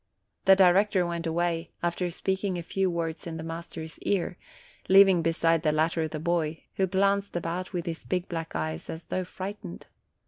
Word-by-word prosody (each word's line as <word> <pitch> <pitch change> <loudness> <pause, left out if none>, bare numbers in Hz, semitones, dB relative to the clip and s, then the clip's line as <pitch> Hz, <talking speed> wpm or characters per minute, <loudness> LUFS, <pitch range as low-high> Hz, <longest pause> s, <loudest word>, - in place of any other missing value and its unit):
The 190 - +8
director 190 0 +4
went 170 -1 -3
away, 165 0 -1
after 175 +1 0
speaking 190 +2 -1
a 170 - -4
few 190 +2 0
words 165 -1 -3
in 165 -1 -5
the 160 - -6
master's 165 -1 -7
ear, 185 -3 0 0.5
leaving 190 -2 +7
beside 165 0 +2
the 155 - +2
latter 160 +1 +1
the 155 0 -5
boy, 165 -1 -1
who 190 - +2
glanced 200 +1 +1
about 175 +2 -3
with 175 -3 -3
his 165 -2 -4
big 180 -1 -2
black 165 - -5
eyes 80 0 -3
as* 160 +1 -5
though 185 - -2
frightened. 185 - -7
170 Hz, 175 wpm, -28 LUFS, 165-185 Hz, 0.5 s, The